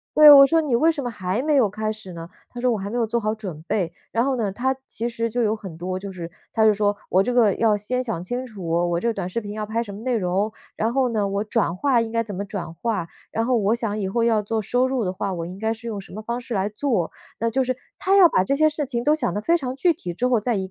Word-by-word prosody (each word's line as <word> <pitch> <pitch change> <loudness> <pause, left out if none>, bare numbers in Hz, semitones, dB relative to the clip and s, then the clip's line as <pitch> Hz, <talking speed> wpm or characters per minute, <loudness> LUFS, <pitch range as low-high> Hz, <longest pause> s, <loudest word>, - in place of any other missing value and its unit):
对， 305 0 +10
我 275 -1 +10
说 325 +4 +3
你 295 -6 +1
为 315 +7 +4
什 305 -3 -4
么 245 - -3
还 195 0 -2
没 300 +1 +1
有 245 -7 +4
开 215 +2 -3
始 215 -4 -11
呢？ 165 -1 -8 0.2
他 245 - -9
说 250 +1 +2
我 225 - 0
还 200 0 -5
没 235 - -3
有 230 -2 +1
做 235 - 0
好 215 0 0
准 185 -8 -7
备， 175 -5 0 0.2
然 230 +2 +1
后 270 -1 +1
呢 220 -5 -1
他 260 +6 -1
其 230 - -3
实 230 -1 -2
就 240 +2 0
有 215 0 +1
很 190 -7 -9
多 185 +2 -3
就 195 +1 -6
是 175 -3 -7 0.2
他 220 - +2
就 215 - +6
说 205 0 0
我 190 +1 +4
这 245 - -1
个 225 -5 +4
要 220 -2 +3
先 250 +5 -2
想 225 -9 -3
清 245 +8 -4
楚， 205 -8 -8 0.2
我 170 0 0
这 235 +3 0
短 190 -4 -4
视 210 - -2
频 205 -2 -7
要 215 0 -3
拍 220 +2 -1
什 210 -4 -6
么 205 - -9
内 250 0 0
容， 195 +2 0 0.2
然 225 +2 -1
后 265 -1 +2
呢 210 -2 +1
我 200 +1 -1
转 215 -5 0
化 245 +5 +2
应 225 -1 -4
该 230 0 +1
怎 210 -3 -6
么 200 - -3
转 195 -5 -6
化， 205 -3 -2 0.2
然 225 - -1
后 255 +1 +2
我 215 -1 +2
想 225 -3 -2
以 195 -3 -2
后 235 +4 0
要 225 -2 +3
做 220 +2 -2
收 245 +5 +1
入 260 -4 -1
的 180 - -2
话， 195 +1 -3
我 170 -2 -4
应 180 +2 -8
该 220 +2 -1
是 225 +1 -10
用 210 -3 -4
什 - - -15
么 215 - -7
方 235 +3 -4
式 245 -1 -6
来 195 -1 0
做。 215 - -1 0.3
那 230 +1 +1
就 265 +4 +1
是， 255 0 -2 0.2
他 390 +1 +3
要 375 -3 +9
把 185 - +2
这 190 - 0
些 310 +1 +5
事 300 -1 -1
情 245 -3 -2
都 300 - +4
想 260 -6 -1
得 205 - -1
非 330 +11 +2
常 255 -5 -4
具 335 +6 +2
体 180 - -6
之 245 +9 0
后 245 -4 +2
再 235 0 0
220 Hz, 325 characters per minute, -23 LUFS, 200-245 Hz, 0.3 s, 对